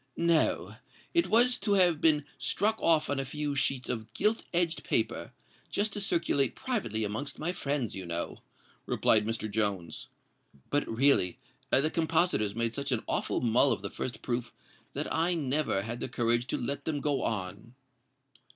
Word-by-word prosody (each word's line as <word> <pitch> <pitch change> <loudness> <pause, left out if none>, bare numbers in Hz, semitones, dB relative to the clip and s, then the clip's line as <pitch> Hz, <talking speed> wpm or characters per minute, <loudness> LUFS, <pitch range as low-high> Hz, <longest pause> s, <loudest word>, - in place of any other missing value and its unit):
"No—it 170 - 0
was 245 +3 +4
to 205 - +1
have 180 -5 +4
been 150 -3 +4
struck 220 +2 +1
off 160 -2 +3
on 145 -1 -1
a - - 0
few 145 +2 -3
sheets 135 -1 0
of 110 -2 -4
gilt 215 +3 +1
edged 170 -1 0
paper—just 205 0 -2
to 205 - -3
circulate 165 -8 +1
privately 195 - -2
amongst 110 +7 -3
my 160 +3 -2
friends, 140 - -2
you 95 -2 -6
know," 85 0 -3 0.5
replied 105 -1 +3
Mr. 115 -1 -2
Jones: 100 -6 -1 0.6
"but 145 0 +1
really 115 -5 +3 0.3
the 150 +5 +3
compositors 160 - +1
made 115 0 -1
such 140 +1 -3
an 120 -3 0
awful - - -1
mull 125 +3 +4
of 95 - -2
the 100 - -4
first 125 - -5
proof 120 -1 -2 0.4
that - - -3
I 170 +2 +1
never 145 -8 0
had 115 +3 -5
the - - -4
courage 120 0 +1
to - - -1
let 140 +4 -4
them 150 -2 -1
go 145 -1 0
on!" 105 +3 -4
140 Hz, 160 wpm, -30 LUFS, 115-165 Hz, 0.6 s, was